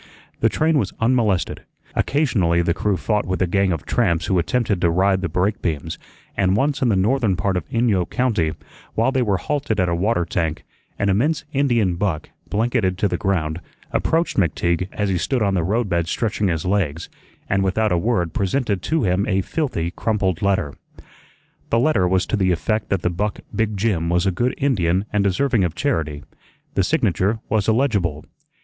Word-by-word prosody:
The -, -, +3 dB
train 155 Hz, -1 st, +2 dB
was -, -, -2 dB
unmolested; 115 Hz, -6 st, +1 dB, 0.3 s
occasionally 100 Hz, -, +1 dB
the 85 Hz, -, +1 dB
crew 100 Hz, +1 st, 0 dB
fought 105 Hz, +2 st, -1 dB
with 95 Hz, 0 st, -1 dB
a 90 Hz, -, +3 dB
gang 95 Hz, +1 st, +1 dB
of 80 Hz, -, -3 dB
tramps 85 Hz, -1 st, +1 dB
who 95 Hz, -, +2 dB
attempted 100 Hz, +1 st, 0 dB
to 85 Hz, -, +3 dB
ride 95 Hz, +2 st, +2 dB
the 95 Hz, -, -2 dB
brake 90 Hz, +6 st, 0 dB
beams, 80 Hz, -1 st, -3 dB, 0.4 s
and 95 Hz, -1 st, +2 dB
once 140 Hz, +3 st, 0 dB
in 125 Hz, -, +3 dB
the 105 Hz, -, +3 dB
northern 105 Hz, +1 st, +2 dB
part 95 Hz, +1 st, -1 dB
of 90 Hz, -, -3 dB
Inyo 110 Hz, -7 st, +1 dB
County, 105 Hz, -12 st, 0 dB, 0.4 s
while 115 Hz, +4 st, +2 dB
they 130 Hz, -1 st, +1 dB
were 105 Hz, -5 st, +1 dB
halted 145 Hz, -, -2 dB
at 90 Hz, -, +2 dB
a -, -, 0 dB
water 90 Hz, 0 st, +1 dB
tank, 85 Hz, -2 st, -2 dB, 0.3 s
an 100 Hz, -, 0 dB
immense 150 Hz, +12 st, +1 dB
Indian 120 Hz, -10 st, +2 dB
buck, 85 Hz, -6 st, -2 dB, 0.2 s
blanketed 105 Hz, -3 st, 0 dB
to 105 Hz, -, +2 dB
the 90 Hz, -, -1 dB
ground, 85 Hz, -4 st, -1 dB, 0.3 s
approached 165 Hz, +1 st, 0 dB
McTeague 85 Hz, 0 st, +1 dB
as 105 Hz, -1 st, -1 dB
he 90 Hz, -2 st, 0 dB
stood 125 Hz, +7 st, 0 dB
on 100 Hz, -1 st, +1 dB
the 90 Hz, -3 st, +1 dB
roadbed 95 Hz, -4 st, 0 dB
stretching 105 Hz, +2 st, -1 dB
his 85 Hz, -2 st, -1 dB
legs, 85 Hz, -5 st, 0 dB, 0.4 s
and 95 Hz, 0 st, +1 dB
without 105 Hz, +3 st, +1 dB
a 90 Hz, -, +3 dB
word 90 Hz, -6 st, 0 dB
presented 100 Hz, 0 st, 0 dB
to 160 Hz, -, 0 dB
him 95 Hz, +1 st, +1 dB
a 95 Hz, -2 st, +1 dB
filthy, 95 Hz, -, -2 dB
crumpled 95 Hz, -4 st, -1 dB
letter. 95 Hz, -7 st, +1 dB, 1.0 s
The 115 Hz, -, +2 dB
letter 115 Hz, -8 st, +3 dB
was 95 Hz, +1 st, +2 dB
to -, -, -1 dB
the 95 Hz, -3 st, +2 dB
effect 110 Hz, +6 st, -1 dB
that 95 Hz, -3 st, 0 dB
the 90 Hz, -, +1 dB
buck 105 Hz, +4 st, -2 dB
Big 110 Hz, -1 st, 0 dB
Jim 95 Hz, -6 st, 0 dB
was 90 Hz, +2 st, +2 dB
a 95 Hz, -, +2 dB
good 120 Hz, +8 st, -1 dB
Indian 95 Hz, -9 st, +1 dB
and 105 Hz, -1 st, +2 dB
deserving 105 Hz, +3 st, +2 dB
of 85 Hz, -2 st, -1 dB
charity; 80 Hz, -, -1 dB, 0.5 s
the -, -, +2 dB
signature 100 Hz, +4 st, +1 dB
was 110 Hz, -3 st, +1 dB
illegible. 105 Hz, -, +1 dB
95 Hz, 190 wpm, -21 LUFS, 90-115 Hz, 1.0 s, The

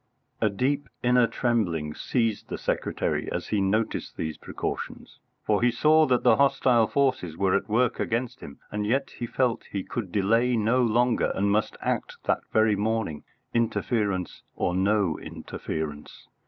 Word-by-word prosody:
A 110 Hz, -, +3 dB
deep 130 Hz, +7 st, -1 dB
inner 125 Hz, -1 st, +4 dB
trembling 100 Hz, -11 st, 0 dB
seized 115 Hz, -, -1 dB
the -, -, -3 dB
secretary -, -, -2 dB
as -, -, -4 dB
he 105 Hz, -2 st, +1 dB
noticed 105 Hz, +3 st, -1 dB
these 80 Hz, -1 st, -3 dB
precautions, -, -, -6 dB, 0.3 s
for 105 Hz, 0 st, +2 dB
he 120 Hz, -, +4 dB
saw 155 Hz, +6 st, +4 dB
that 125 Hz, -2 st, +2 dB
the -, -, +5 dB
hostile 130 Hz, -4 st, +4 dB
forces 130 Hz, -, 0 dB
were 95 Hz, -1 st, +2 dB
at 100 Hz, -, -1 dB
work 120 Hz, +3 st, +2 dB
against 120 Hz, +1 st, -2 dB
him, -, -, -10 dB
and 105 Hz, 0 st, -2 dB
yet 135 Hz, +5 st, 0 dB
he 120 Hz, -, -3 dB
felt 125 Hz, -1 st, 0 dB
he 100 Hz, -2 st, -3 dB
could 110 Hz, -7 st, -5 dB
delay 115 Hz, +5 st, +2 dB
no 115 Hz, +4 st, +2 dB
longer 120 Hz, +1 st, +2 dB
and 100 Hz, +1 st, +1 dB
must 105 Hz, +1 st, 0 dB
act -, -, -2 dB
that -, -, +1 dB
very 110 Hz, -1 st, +4 dB
morning, 105 Hz, -6 st, -1 dB, 0.3 s
interference 110 Hz, -5 st, -1 dB
or 90 Hz, -, 0 dB
no 95 Hz, -2 st, +1 dB
interference. 75 Hz, -2 st, -6 dB
110 Hz, 155 wpm, -26 LUFS, 100-125 Hz, 0.3 s, the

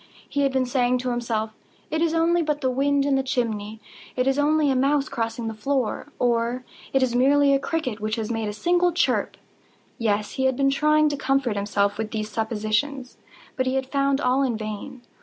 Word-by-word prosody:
He 285 Hz, -, -1 dB
had 275 Hz, -1 st, +2 dB
been 260 Hz, -1 st, +1 dB
saying 250 Hz, 0 st, +1 dB
to 250 Hz, 0 st, -2 dB
himself—"It 235 Hz, +6 st, -4 dB
is 330 Hz, -1 st, +2 dB
nothing 335 Hz, +1 st, +2 dB
but 300 Hz, -1 st, -1 dB
the 260 Hz, -2 st, +1 dB
wind 280 Hz, +2 st, +1 dB
in 285 Hz, -, +1 dB
the 270 Hz, -, +3 dB
chimney—it 225 Hz, 0 st, -4 dB
is 270 Hz, +1 st, +1 dB
only 300 Hz, 0 st, +3 dB
a -, -, +1 dB
mouse 275 Hz, +2 st, +2 dB
crossing 230 Hz, 0 st, -3 dB
the 225 Hz, -, -3 dB
floor," 260 Hz, +4 st, -2 dB
or 240 Hz, +1 st, 0 dB, 0.3 s
"It 270 Hz, -1 st, +2 dB
is 250 Hz, -2 st, 0 dB
merely 280 Hz, +3 st, +4 dB
a 275 Hz, -, +3 dB
cricket 280 Hz, -8 st, -3 dB
which 215 Hz, 0 st, -2 dB
has 225 Hz, -1 st, -3 dB
made 225 Hz, -2 st, -2 dB
a -, -, -4 dB
single 350 Hz, +9 st, +2 dB
chirp." 345 Hz, -, 0 dB, 0.6 s
Yes, 210 Hz, -2 st, 0 dB
he 265 Hz, -, -1 dB
had 260 Hz, -1 st, +1 dB
been 275 Hz, 0 st, +3 dB
trying 305 Hz, +2 st, +3 dB
to 290 Hz, -, -3 dB
comfort 270 Hz, -5 st, 0 dB
himself 200 Hz, 0 st, 0 dB
with 220 Hz, -1 st, -2 dB
these 215 Hz, -1 st, -4 dB
suppositions: 225 Hz, +5 st, -2 dB, 0.4 s
but 260 Hz, -1 st, -1 dB
he 260 Hz, -, 0 dB
had 265 Hz, 0 st, 0 dB
found 275 Hz, -1 st, +1 dB
all 255 Hz, 0 st, +2 dB
in 250 Hz, -5 st, 0 dB
vain. 215 Hz, +4 st, -7 dB
255 Hz, 200 wpm, -24 LUFS, 225-280 Hz, 0.6 s, merely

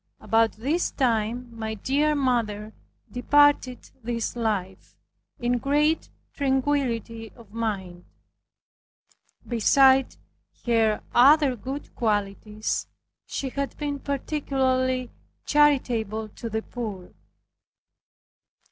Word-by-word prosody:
About 225 Hz, 0 st, +2 dB
this 285 Hz, +11 st, -1 dB
time 240 Hz, -1 st, 0 dB
my 220 Hz, -1 st, -4 dB
dear 290 Hz, +8 st, +1 dB
mother 225 Hz, -6 st, -1 dB, 0.4 s
departed 285 Hz, 0 st, +2 dB
this 230 Hz, 0 st, -3 dB
life 205 Hz, -5 st, -3 dB, 0.4 s
in 245 Hz, 0 st, 0 dB
great 295 Hz, +5 st, +1 dB, 0.2 s
tranquility 260 Hz, -5 st, -1 dB
of 225 Hz, -4 st, -17 dB
mind. 195 Hz, -6 st, -4 dB, 1.4 s
Beside 265 Hz, +3 st, +4 dB, 0.5 s
her 225 Hz, -3 st, +2 dB
other 280 Hz, +1 st, +6 dB
good 265 Hz, +5 st, -7 dB
qualities, 210 Hz, -1 st, -2 dB, 0.4 s
she 270 Hz, -, -3 dB
had 280 Hz, +1 st, -4 dB
been 290 Hz, -2 st, -3 dB
particularly 260 Hz, -3 st, -1 dB, 0.3 s
charitable 235 Hz, -7 st, +2 dB
to 230 Hz, +3 st, -7 dB
the 220 Hz, 0 st, -3 dB
poor. 210 Hz, -7 st, -7 dB
245 Hz, 85 wpm, -25 LUFS, 220-275 Hz, 1.4 s, other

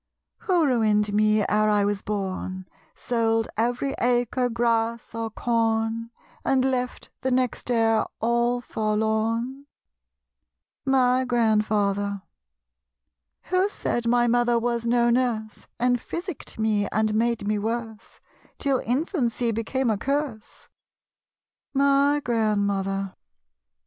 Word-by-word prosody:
Who 355 Hz, -4 st, +2 dB
ruined 215 Hz, -5 st, +2 dB
me 215 Hz, 0 st, +3 dB
ere 215 Hz, +1 st, +2 dB
I 205 Hz, -1 st, +3 dB
was 205 Hz, -1 st, -1 dB
born, 190 Hz, -2 st, -4 dB, 0.3 s
Sold 225 Hz, -2 st, 0 dB
every 245 Hz, +4 st, 0 dB
acre, 245 Hz, +1 st, +1 dB
grass 230 Hz, -1 st, 0 dB
or 230 Hz, 0 st, -3 dB
corn, 225 Hz, 0 st, 0 dB, 0.3 s
And 260 Hz, -1 st, +2 dB
left 250 Hz, -1 st, -2 dB
the 260 Hz, -, 0 dB
next 255 Hz, -1 st, -1 dB
heir 225 Hz, -2 st, +2 dB
all 235 Hz, +1 st, +1 dB
forlorn? 220 Hz, +5 st, -1 dB, 1.2 s
My 260 Hz, -1 st, +3 dB
Grandfather. 210 Hz, -4 st, +1 dB, 1.2 s
Who 370 Hz, +2 st, +1 dB
said 240 Hz, -, -2 dB
my 240 Hz, 0 st, +3 dB
mother 240 Hz, 0 st, +2 dB
was 235 Hz, 0 st, -1 dB
no 240 Hz, 0 st, +3 dB
nurse. 235 Hz, -4 st, -1 dB
And 245 Hz, 0 st, +2 dB
physicked 345 Hz, -3 st, -6 dB
me 215 Hz, -2 st, +1 dB
and 215 Hz, 0 st, 0 dB
made 230 Hz, 0 st, 0 dB
me 210 Hz, 0 st, +1 dB
worse, 225 Hz, 0 st, -5 dB, 0.4 s
Till 275 Hz, -3 st, +1 dB
infancy 245 Hz, -, -1 dB
became 230 Hz, +3 st, -1 dB
a 205 Hz, -, -1 dB
curse? 275 Hz, -4 st, -3 dB, 1.1 s
My 280 Hz, +1 st, +3 dB
Grandmother. 200 Hz, -4 st, 0 dB
230 Hz, 110 wpm, -25 LUFS, 215-250 Hz, 1.2 s, me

